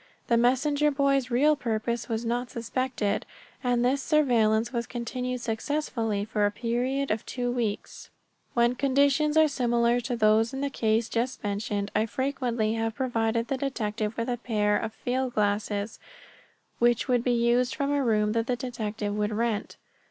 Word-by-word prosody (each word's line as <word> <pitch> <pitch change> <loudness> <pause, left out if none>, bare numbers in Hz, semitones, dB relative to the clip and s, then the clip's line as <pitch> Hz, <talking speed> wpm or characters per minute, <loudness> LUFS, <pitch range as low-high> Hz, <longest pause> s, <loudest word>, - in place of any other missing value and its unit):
The 235 - +4
messenger 275 +5 +3
boy's 275 -2 +1
real 290 +5 +4
purpose 235 -2 -2
was 225 +1 -2
not 240 +1 -1
suspected, 235 -3 -2 0.4
and 245 -1 +2
this 270 +2 +2
surveillance 235 -7 +2
was 235 -1 -2
continued 250 +1 -4
successfully 225 -3 -2
for 215 -1 -1
a - - -2
period 245 +5 -1
of 215 0 -1
two 245 -1 -3
weeks. 230 -4 -3 0.5
When 240 0 +3
conditions 280 +3 +2
are 315 0 +6
similar 240 -3 +1
to 245 0 -3
those 225 +2 +3
in 270 - -3
the 280 0 -1
case 220 -2 +1
just 245 +3 -2
mentioned 205 0 -2
I 215 +2 +2
frequently 245 -4 -1
have 225 -1 -2
provided 230 -3 0
the 270 - -1
detective 220 -5 -2
with 230 - -1
a 245 - -1
pair 210 -3 +1
of 220 +1 -2
field 250 +2 -2
glasses 205 0 -1 0.8
which 240 0 +3
would 245 -2 +2
be 250 - 0
used 240 +2 +2
from 280 0 -1
a 285 -1 +1
room 210 -3 +2
that 230 +1 0
the 250 - +1
detective 220 -4 -4
would 210 0 0
rent. 220 -1 -2
235 Hz, 165 wpm, -27 LUFS, 220-260 Hz, 0.8 s, are